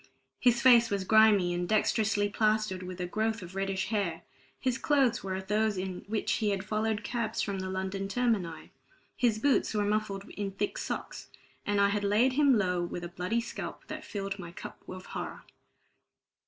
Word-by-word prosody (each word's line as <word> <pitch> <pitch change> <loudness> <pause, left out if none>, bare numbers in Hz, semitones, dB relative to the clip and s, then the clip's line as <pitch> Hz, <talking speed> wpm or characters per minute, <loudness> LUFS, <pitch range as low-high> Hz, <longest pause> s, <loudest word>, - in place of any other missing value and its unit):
His 240 -1 +3
face 240 -3 +7
was 200 -1 -1
grimy, 210 -3 +5
and 175 0 -2
dexterously 215 -1 +2
plastered 215 -3 +1
with 180 0 -7
a 180 - -1
growth 220 +3 -1
of 180 +1 -10
reddish 195 0 -2
hair; 200 -7 -1 0.4
his 255 -1 -1
clothes 270 -5 +2
were 190 -1 -2
those 210 +1 +1
in 185 -1 -4
which 215 0 -1
he 215 -2 +1
had 195 -2 -1
followed 215 0 -1
cabs 230 -1 -2
from 200 -2 -2
the 185 0 -4
London 190 +1 -3
termini; 200 -7 -1 0.4
his 235 -4 +2
boots 260 -1 +2
were 205 -1 +1
muffled 205 -1 -1
in 200 -1 -4
thick 205 +1 -2
socks; - - -5 0.4
and 205 0 +2
I 200 0 +5
had 205 0 -1
laid 215 +6 +3
him 280 -3 +5
low 180 -3 +1
with 175 0 -5
a 175 - -5
bloody 180 +7 -1
scalp - - -7
that - - -6
filled 195 -1 -4
my 170 -2 -7
cup - - -9
of 185 0 -8
horror. - - -6
205 Hz, 180 wpm, -30 LUFS, 190-220 Hz, 0.4 s, face